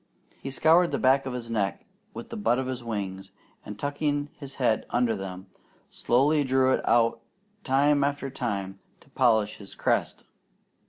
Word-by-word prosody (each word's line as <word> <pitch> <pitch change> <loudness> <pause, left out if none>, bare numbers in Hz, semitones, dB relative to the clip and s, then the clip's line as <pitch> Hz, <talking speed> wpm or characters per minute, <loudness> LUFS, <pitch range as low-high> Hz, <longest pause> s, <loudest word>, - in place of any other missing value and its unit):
He 135 - -5
scoured 165 +5 +4
the - - -1
back 135 +1 +3
of 130 - -4
his 120 -2 -6
neck 100 -3 -2 0.3
with - - -9
the - - -5
butt 205 - +1
of 130 - -2
his 130 -1 -4
wings, 95 -4 -5 0.3
and 105 - -8
tucking 145 +3 -2
his 140 -2 -10
head 120 -4 0
under 120 -1 +1
them, 95 -1 -7 0.5
slowly 145 +5 +2
drew 130 0 +2
it - - 0
out 115 0 +3 0.4
time 145 +1 +3
after 140 -1 -2
time 100 -7 -4 0.2
to - - -23
polish 110 -3 +2
his 100 -2 -12
crest. - - -1
125 Hz, 165 wpm, -26 LUFS, 110-140 Hz, 0.5 s, scoured